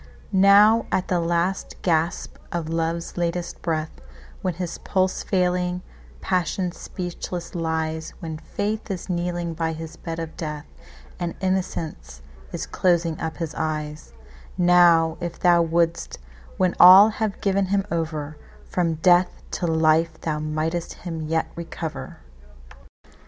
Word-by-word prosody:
Now 205 +3 +6
at 185 - 0
the 180 - +2
last 170 +3 -1
gasp 165 -1 0
of 170 -2 -3
love's 165 +1 -2
latest 175 0 -2
breath, 155 - -3 0.4
When 185 -3 -1
his 175 -1 -5
pulse 185 -1 0
failing, 180 -1 0 0.4
passion 180 0 0
speechless 175 0 -6
lies, 160 -1 -2
When 160 -2 -6
faith 210 +7 -3
is 190 -1 -4
kneeling 175 -1 -2
by 160 0 -2
his 160 0 -8
bed 165 -1 -6
of 165 -1 -6
death, 150 -2 -5 0.5
And 175 -1 -3
innocence 180 - -3 0.3
is - - -4
closing 170 -3 +1
up 160 0 -3
his 165 -3 -4
eyes,—Now 155 - +1
if 175 -1 -4
thou 175 -1 +5
wouldst, 170 0 0 0.4
when 185 -1 +2
all 190 +4 +10
have 215 -2 -3
given 195 -1 +1
him 195 0 +1
over, 155 -3 -3 0.3
From 170 -3 0
death 175 +2 +3
to 175 - -2
life 160 0 +2
thou 155 -2 -2
mightst 155 +3 -2
him 165 -2 -4
yet 160 +1 +1
recover! 165 -1 -6
170 Hz, 130 wpm, -24 LUFS, 160-180 Hz, 0.5 s, all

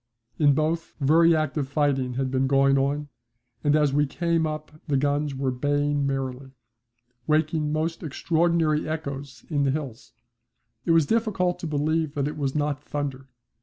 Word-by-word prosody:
In 145 -3 +5
both 160 +2 -1
very 165 +4 +5
active 150 -2 -1
fighting 140 -4 0
had 130 0 -1
been 130 0 +1
going 135 0 +4
on, 145 +2 0 0.5
and 145 0 +3
as 150 -3 +3
we 145 0 +2
came 165 +2 0
up 155 0 -5 0.2
the 145 -3 +2
guns 145 +1 0
were 135 -1 -1
baying 145 +2 0
merrily, 135 -1 -4 0.7
waking 155 0 +1
up - - -2
most 160 +2 -1
extraordinary 160 0 +1
echoes 140 -3 -5
in 145 -2 +1
the 140 - +2
hills. 125 -6 -5 0.7
It - - +2
was 165 -2 +5
difficult 200 -4 0
to 170 - -4
believe 155 +1 0
that 140 -1 0
it 150 - -4
was 140 -2 -2
not 145 -1 -1
thunder. 140 -3 -4
145 Hz, 165 wpm, -25 LUFS, 135-155 Hz, 0.7 s, In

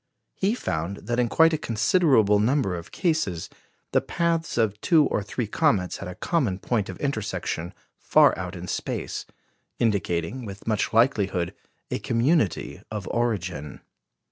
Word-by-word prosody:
He 200 +4 0
found 90 - -3
that 120 0 -1
in 120 -1 +2
quite 165 0 +5
a 155 - 0
considerable 115 - +3
number 115 -3 +1
of 85 -1 -8
cases, 155 - -1 0.4
the - - +3
paths 165 -3 -1
of 110 -3 +1
two 160 -4 +5
or - - 0
three 110 +4 -3
comets 105 - +1
had 100 - -7
a 90 - -7
common 130 - 0
point 105 +1 -1
of - - -6
intersection 100 - -2 0.3
far - - +5
out 90 +1 -5
in 90 +1 -7
space, - - -4 0.5
indicating 100 0 0
with 100 -2 -9
much 110 -2 0
likelihood 100 -7 +2 0.4
a - - -1
community 120 - +1
of 105 -3 -5
origin. 90 - -2
110 Hz, 145 wpm, -25 LUFS, 95-135 Hz, 0.5 s, quite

